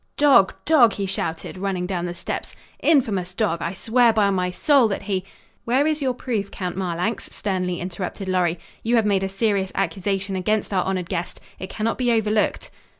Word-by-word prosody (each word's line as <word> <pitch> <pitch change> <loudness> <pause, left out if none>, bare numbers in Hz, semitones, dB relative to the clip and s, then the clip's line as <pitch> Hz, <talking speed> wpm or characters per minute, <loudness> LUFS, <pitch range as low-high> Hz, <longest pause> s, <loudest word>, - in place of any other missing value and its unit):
"Dog! 275 -10 +5
Dog!" 255 -9 +5
he 200 - -3
shouted, 185 -1 -3
running 190 -2 -2
down 180 -2 -2
the 175 0 -4
steps. 170 - -5 0.2
"Infamous 200 - +2
dog! 185 -6 0
I 170 +3 -3
swear 235 +4 +3
by 210 -2 +2
my 180 -1 0
soul 265 +6 +4
that 200 - -3
he 195 -2 -1 0.2
" - - -36
"Where 260 +5 +2
is 310 -1 0
your 260 -2 0
proof, 220 -6 -3
Count 180 -3 -4
Marlanx?" 185 +4 -2
sternly 180 -3 -2
interrupted 185 +2 -5
Lorry. 180 -2 +1 0.2
"You 235 +2 +1
have 225 -2 +3
made 200 -2 +2
a 195 - -1
serious 195 -1 0
accusation 195 +1 -1
against 205 +3 0
our 185 - +2
honored 185 -2 -2
guest. 175 -1 -4 0.2
It 190 - -6
cannot 225 +4 -2
be 245 -1 +2
overlooked." 215 -2 0
195 Hz, 190 wpm, -23 LUFS, 185-225 Hz, 0.2 s, Dog